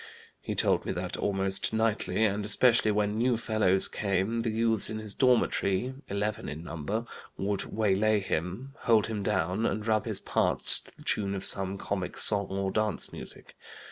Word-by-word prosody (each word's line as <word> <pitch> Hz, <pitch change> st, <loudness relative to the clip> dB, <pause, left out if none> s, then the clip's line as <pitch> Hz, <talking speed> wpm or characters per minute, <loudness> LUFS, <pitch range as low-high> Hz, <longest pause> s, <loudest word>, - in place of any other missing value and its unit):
He -, -, -4 dB
told -, -, +2 dB
me -, -, -3 dB
that -, -, -4 dB
almost 95 Hz, +1 st, +1 dB
nightly, 110 Hz, 0 st, 0 dB
and 100 Hz, 0 st, 0 dB
especially 110 Hz, +2 st, +3 dB
when 105 Hz, +1 st, 0 dB
new 120 Hz, 0 st, +2 dB
fellows 110 Hz, -4 st, +3 dB
came, 100 Hz, +3 st, -1 dB
the 115 Hz, -, -1 dB
youths 110 Hz, -1 st, +2 dB
in 110 Hz, -, -4 dB
his 110 Hz, -2 st, -6 dB
dormitory 125 Hz, -3 st, +1 dB, 0.2 s
(eleven 105 Hz, +1 st, -2 dB
in 80 Hz, +2 st, -7 dB
number) 95 Hz, +8 st, -4 dB, 0.3 s
would 100 Hz, 0 st, -2 dB
waylay 105 Hz, 0 st, +1 dB
him, 95 Hz, -, -4 dB
hold 110 Hz, -3 st, +3 dB
him 110 Hz, -2 st, -4 dB
down, 95 Hz, +2 st, 0 dB
and 105 Hz, +1 st, -3 dB
rub 110 Hz, -1 st, +1 dB
his -, -, -1 dB
parts -, -, +3 dB
to -, -, -17 dB
the -, -, -14 dB
tune 100 Hz, -1 st, -1 dB
of 95 Hz, 0 st, -3 dB
some 95 Hz, 0 st, +1 dB
comic 95 Hz, -2 st, -4 dB
song 100 Hz, -2 st, +2 dB
or 95 Hz, 0 st, -2 dB
dance 110 Hz, -1 st, 0 dB
music. -, -, -8 dB
105 Hz, 175 wpm, -28 LUFS, 95-110 Hz, 0.3 s, especially